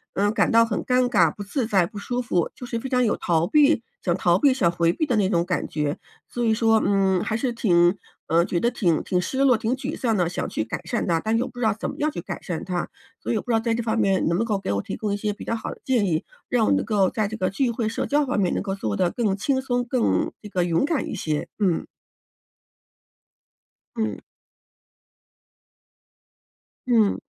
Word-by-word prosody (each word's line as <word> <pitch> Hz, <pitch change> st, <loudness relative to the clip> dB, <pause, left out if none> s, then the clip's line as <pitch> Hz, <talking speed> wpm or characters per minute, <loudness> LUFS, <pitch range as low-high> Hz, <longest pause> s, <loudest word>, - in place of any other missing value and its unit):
嗯， 205 Hz, +1 st, +2 dB
感 -, -, +1 dB
到 230 Hz, 0 st, +6 dB
很 225 Hz, -2 st, -2 dB
尴 250 Hz, -1 st, +2 dB
尬、 -, -, +3 dB
不 -, -, -10 dB
自 235 Hz, +4 st, -2 dB
在、 190 Hz, -6 st, +2 dB
不 210 Hz, -, -11 dB
舒 245 Hz, +5 st, -2 dB
服， 180 Hz, -8 st, 0 dB
就 245 Hz, -, -9 dB
是 230 Hz, -3 st, -3 dB
非 265 Hz, -, -5 dB
常 250 Hz, -1 st, +2 dB
有 220 Hz, -, +1 dB
逃 170 Hz, -1 st, +1 dB
避 295 Hz, -, +4 dB, 0.2 s
想 175 Hz, -1 st, +2 dB
逃 175 Hz, -1 st, +3 dB
避、 270 Hz, +4 st, +4 dB
想 175 Hz, -10 st, +2 dB
回 170 Hz, 0 st, +1 dB
避 310 Hz, -, -1 dB
的 245 Hz, -, +1 dB
那 205 Hz, -3 st, +2 dB
种 170 Hz, -3 st, +1 dB
感 175 Hz, -3 st, -2 dB
觉。 150 Hz, -1 st, -2 dB, 0.3 s
所 240 Hz, -1 st, -2 dB
以 220 Hz, -, +3 dB
说， 225 Hz, 0 st, +3 dB
嗯， 195 Hz, -2 st, +2 dB
还 220 Hz, -, -2 dB
是 245 Hz, +2 st, -1 dB
挺 175 Hz, -5 st, +3 dB, 0.3 s
嗯， 170 Hz, +2 st, +3 dB
觉 170 Hz, -, -1 dB
得 235 Hz, -, +2 dB
挺 180 Hz, -10 st, +1 dB
挺 180 Hz, -, 0 dB
失 225 Hz, +9 st, -3 dB
落、 265 Hz, -4 st, +5 dB
挺 225 Hz, +4 st, -1 dB
沮 270 Hz, +3 st, -5 dB
丧 230 Hz, -4 st, 0 dB
的， 175 Hz, -3 st, +1 dB
想 175 Hz, -, -3 dB
去 -, -, -2 dB
改 110 Hz, -, -5 dB
善 235 Hz, -, -2 dB
它， 165 Hz, -1 st, +2 dB
但 220 Hz, +7 st, -1 dB
是 225 Hz, -, +3 dB
又 250 Hz, -, -1 dB
不 245 Hz, -, -14 dB
知 245 Hz, -, -3 dB
道 215 Hz, -, +3 dB
怎 220 Hz, -, -4 dB
么 -, -, -7 dB
样 305 Hz, +1 st, 0 dB
去 170 Hz, -, -5 dB
改 -, -, -5 dB
善 170 Hz, -3 st, -4 dB
它。 180 Hz, -2 st, -2 dB, 0.4 s
所 -, -, -1 dB
以 -, -, +1 dB
我 -, -, -1 dB
不 -, -, -14 dB
知 -, -, +2 dB
道 225 Hz, -, +4 dB
在 230 Hz, 0 st, 0 dB
这 235 Hz, -, -1 dB
方 225 Hz, 0 st, -1 dB
面 195 Hz, -3 st, +2 dB
能 170 Hz, +1 st, +1 dB
不 220 Hz, -, +1 dB
能 -, -, -2 dB
够 210 Hz, -3 st, -1 dB
给 195 Hz, -, -3 dB
我 100 Hz, -, -1 dB
提 -, -, -5 dB
供 210 Hz, -2 st, -3 dB
一 200 Hz, -, 0 dB
些 210 Hz, 0 st, -2 dB
比 -, -, -10 dB
较 230 Hz, -, -2 dB
好 225 Hz, -, -5 dB
的 -, -, -18 dB
建 245 Hz, -6 st, +2 dB
议， 165 Hz, -4 st, 0 dB, 0.2 s
让 235 Hz, -3 st, +2 dB
我 -, -, +3 dB
能 -, -, +2 dB
够 200 Hz, -4 st, +2 dB
在 215 Hz, -2 st, -1 dB
这 215 Hz, -, -6 dB
个 185 Hz, -4 st, 0 dB
聚 240 Hz, +5 st, 0 dB
会 230 Hz, -2 st, -2 dB
社 225 Hz, -, -2 dB
交 295 Hz, +1 st, +2 dB
方 255 Hz, -6 st, -1 dB
面 185 Hz, -3 st, +1 dB
能 -, -, -1 dB
够 195 Hz, 0 st, -3 dB
做 105 Hz, -, -3 dB
得 180 Hz, -, +2 dB
更 210 Hz, -1 st, 0 dB
轻 260 Hz, +6 st, 0 dB
松、 245 Hz, -2 st, -1 dB
更 245 Hz, -1 st, 0 dB
这 210 Hz, -, -7 dB
个 185 Hz, -3 st, 0 dB
勇 170 Hz, +9 st, +1 dB
敢 320 Hz, -2 st, -1 dB
一 -, -, -4 dB
些， 155 Hz, -6 st, -2 dB
嗯。 190 Hz, -6 st, 0 dB, 2.1 s
嗯。 220 Hz, -1 st, -2 dB, 2.7 s
嗯。 225 Hz, -5 st, +3 dB
215 Hz, 270 characters per minute, -24 LUFS, 180-240 Hz, 2.7 s, 到